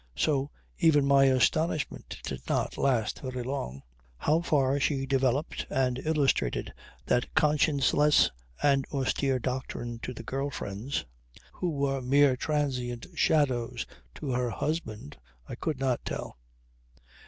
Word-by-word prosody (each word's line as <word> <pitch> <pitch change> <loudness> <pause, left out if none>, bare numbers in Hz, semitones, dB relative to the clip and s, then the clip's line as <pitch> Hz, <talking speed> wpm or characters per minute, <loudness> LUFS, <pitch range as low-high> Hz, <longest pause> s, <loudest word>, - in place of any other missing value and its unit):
So 140 -2 +1 0.3
even 150 -4 +5
my 140 0 +5
astonishment 145 +4 +1
did - - -5
not - - 0
last 125 -6 +1
very 130 -2 -4
long. 95 - -4 0.3
How 155 - +2
far 140 -4 +2
she 135 -1 0
developed 135 +2 0
and 130 -1 +1
illustrated 150 - +1 0.3
that 120 - +1
conscienceless 150 -1 +4 0.3
and 140 -1 +4
austere 135 -1 +1
doctrine 125 -2 -4
to 125 - -5
the 115 -2 -8
girl 135 +4 -2
friends, 115 - -4 0.5
who 180 - -2
were 140 -3 -1
mere 135 +1 +4
transient 125 -4 -2
shadows 130 -8 +1 0.3
to 140 - -4
her 125 0 0
husband, 110 - -4 0.3
I - - -7
could 140 +3 -3
not 130 -3 0
tell. - - -5
135 Hz, 125 wpm, -29 LUFS, 125-145 Hz, 0.5 s, even